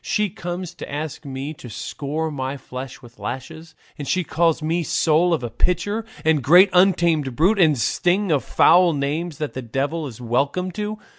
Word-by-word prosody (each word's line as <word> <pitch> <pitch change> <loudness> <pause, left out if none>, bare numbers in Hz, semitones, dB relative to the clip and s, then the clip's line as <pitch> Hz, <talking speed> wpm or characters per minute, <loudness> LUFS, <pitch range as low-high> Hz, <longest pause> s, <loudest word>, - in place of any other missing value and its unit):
She 210 -3 0
comes 175 -2 -6
to - - -9
ask 150 +1 -5
me 135 +2 -5
to 130 -5 -11
score 150 +8 -4
my 135 -1 -4
flesh 130 0 -8
with 120 -1 -16
lashes, 160 +6 -7 0.2
and 145 - -5
she 185 -1 +1
calls 165 -1 +1
me 165 +3 0
soul 165 +2 +2
of 160 -6 0
a 120 - -4
pitcher, 180 - -1 0.2
and 160 -2 +3
great 180 +9 +6
untamed 170 -7 +3
brute, 190 - +3
and 160 -5 +5
a - - -6
string 180 - +1
of 145 -3 +2
foul 175 0 +5
names 150 +3 -2
that 150 -2 -4
the 130 - -5
devil 140 +6 -2
is 120 -4 -10
welcome 140 +10 -1
to. 210 +3 -4
160 Hz, 190 wpm, -22 LUFS, 140-175 Hz, 0.2 s, great